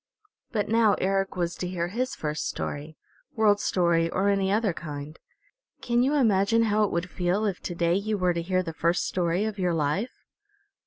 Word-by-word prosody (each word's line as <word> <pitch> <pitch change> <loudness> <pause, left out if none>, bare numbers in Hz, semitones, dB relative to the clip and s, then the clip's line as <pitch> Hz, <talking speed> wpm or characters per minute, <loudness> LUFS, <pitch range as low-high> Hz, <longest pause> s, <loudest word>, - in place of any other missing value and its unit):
But 210 -4 -1
now 225 -1 +4
Eric 195 0 0
was 175 -1 -1
to 180 - -3
hear 175 -1 -2
his 255 +6 -2
first 150 0 -3
story, 150 +2 -5 0.4
World 210 -3 +4
Story 170 -4 +2
or 195 +4 +1
any 195 -1 +1
other 210 -2 +1
kind. 150 -1 -7 0.6
Can 240 0 +1
you 275 +4 +2
imagine 230 -3 +3
how 215 -1 +2
it - - -3
would 170 +1 -1
feel 180 +4 0
if 195 -4 -1
to 175 - -5
day 170 0 +1
you 205 +3 0
were 180 -2 +2
to 170 - -2
hear 185 +2 0
the 165 -2 -5
first 170 +2 +1
story 180 +2 0
of 215 -2 -4
your 180 -2 +1
life? 160 - -2
185 Hz, 195 wpm, -26 LUFS, 170-210 Hz, 0.6 s, now